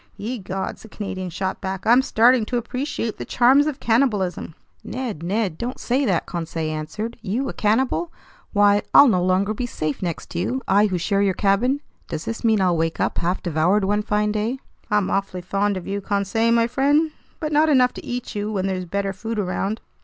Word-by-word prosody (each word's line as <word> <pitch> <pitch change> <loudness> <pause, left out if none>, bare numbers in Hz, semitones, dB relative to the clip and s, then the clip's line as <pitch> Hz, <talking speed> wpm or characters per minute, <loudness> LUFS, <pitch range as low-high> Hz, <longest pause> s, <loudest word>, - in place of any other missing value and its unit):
"Ye 235 +4 -4
gods," 190 0 -5
the 220 - -13
Canadian 190 -3 -5
shot 190 +2 -3
back, 190 0 -4
"I'm 240 +3 +6
starting 245 -1 +4
to 245 - -1
appreciate 240 -1 -3
the - - -3
charms 265 +4 +4
of 295 -2 -3
cannibalism!" 210 - 0 0.3
"Ned, 240 - -5
Ned! 190 -1 -1
Don't 245 +2 -4
say 265 +3 0
that!" 185 -7 +1
Conseil 165 -2 -3
answered. 210 +10 -5
"You 230 +6 -2
a - - -5
cannibal? 260 +10 +1 0.4
Why, 205 -1 +4
I'll 285 - +10
no 185 -7 +2
longer 185 +3 +2
be 245 +3 -3
safe 155 - -3
next 170 -4 -4
to 170 - -3
you, 255 +9 -2
I 205 +2 +4
who 185 -3 -1
share 200 +3 0
your 195 -2 +2
cabin! 240 +8 +2 0.3
Does 160 0 -5
this 230 - -4
mean 220 -3 +3
I'll 180 -2 +3
wake 165 0 -1
up - - 0
half 175 +2 -1
devoured 175 +5 +2
one 205 +2 +1
fine 210 0 0
day?" 215 +5 -1 0.3
"I'm 210 -2 +1
awfully 195 -2 -1
fond 200 +2 0
of 185 - -7
you, 200 +1 -3
Conseil 200 +3 0
my 230 0 +4
friend, 285 +6 +2 0.3
but 310 -2 -3
not 305 +1 +4
enough 255 -4 +4
to - - -9
eat 245 0 -5
you 210 0 -3
when 195 -3 -1
there's 185 -1 -2
better 195 +2 -2
food 225 +4 -5
around." 200 +2 -2
205 Hz, 205 wpm, -22 LUFS, 185-240 Hz, 0.4 s, I'll